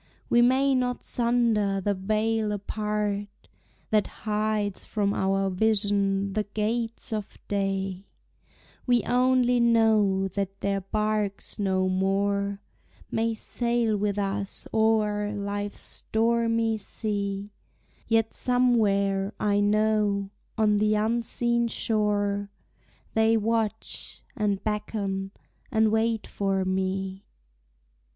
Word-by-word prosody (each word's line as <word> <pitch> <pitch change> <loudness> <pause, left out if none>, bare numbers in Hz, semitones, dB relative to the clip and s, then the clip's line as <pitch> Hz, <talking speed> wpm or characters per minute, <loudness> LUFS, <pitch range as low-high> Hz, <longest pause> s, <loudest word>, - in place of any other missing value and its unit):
We 240 - +6
may 265 +3 +4
not 250 -1 0
sunder 230 -5 +1
the 200 +2 0
veil 215 +2 0
apart 210 0 -2 0.6
That 215 -1 +3 0.2
hides 210 -1 -1
from 205 -2 -1
our 195 0 +1
vision 200 -1 +1
the 215 0 0
gates 225 +2 -2
of 210 -2 -5
day; 195 -1 -2 0.8
We 245 -1 +3
only 250 0 +3
know 220 -5 +3
that 195 +1 -4
their 195 0 0
barks 210 +1 -2
no 190 -2 +1
more 200 +1 0 0.5
May 225 0 0
sail 235 0 0
with 205 0 -1
us 200 0 -2
o'er 215 -2 +2
life's 205 0 -4
stormy 230 0 0
sea; 200 -1 -3 0.6
Yet 225 -1 +2
somewhere, 205 -5 +2
I 205 -1 +2
know, 205 -1 +1 0.3
on 210 -1 +3
the 215 +1 +2
unseen 235 +2 +1
shore, 205 -3 0 0.6
They 220 0 +4
watch, 220 0 -2
and 205 -2 -1
beckon, 205 -2 -2 0.4
and 220 -1 +3
wait 220 0 +1
for 195 -1 -1
me. 190 +1 -2
210 Hz, 100 wpm, -26 LUFS, 200-225 Hz, 0.8 s, We